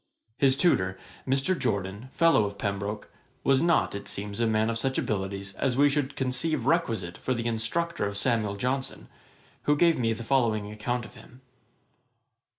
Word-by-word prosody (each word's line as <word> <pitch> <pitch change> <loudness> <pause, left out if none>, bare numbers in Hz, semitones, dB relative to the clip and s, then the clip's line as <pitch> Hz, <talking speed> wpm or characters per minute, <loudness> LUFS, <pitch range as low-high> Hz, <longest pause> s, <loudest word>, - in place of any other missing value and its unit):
His 135 -1 +4
tutor, 95 - +2 0.3
Mr. 135 +7 +2
Jorden, 100 - -2
fellow 165 -10 +4
of 100 0 -5
Pembroke, 100 +1 -3 0.3
was 135 -1 +4
not, 170 0 +2
it 100 - -6
seems, 100 +1 -4
a 115 - +2
man 110 +1 +2
of 115 - -2
such 130 +2 -1
abilities 100 -1 -2
as 130 -2 0
we 145 +1 +5
should 140 -1 -1
conceive 130 +1 -1
requisite 115 - 0
for 130 - -1
the 115 0 -3
instructor 120 +5 -1
of 100 0 -4
Samuel 110 -3 +1
Johnson, 130 +5 -3 0.6
who 150 - +4
gave 165 0 +3
me 115 -2 +1
the 115 - -7
following 110 -5 +1
account 120 +3 -3
of - - -13
him. 125 +2 -16
115 Hz, 165 wpm, -27 LUFS, 105-135 Hz, 0.6 s, we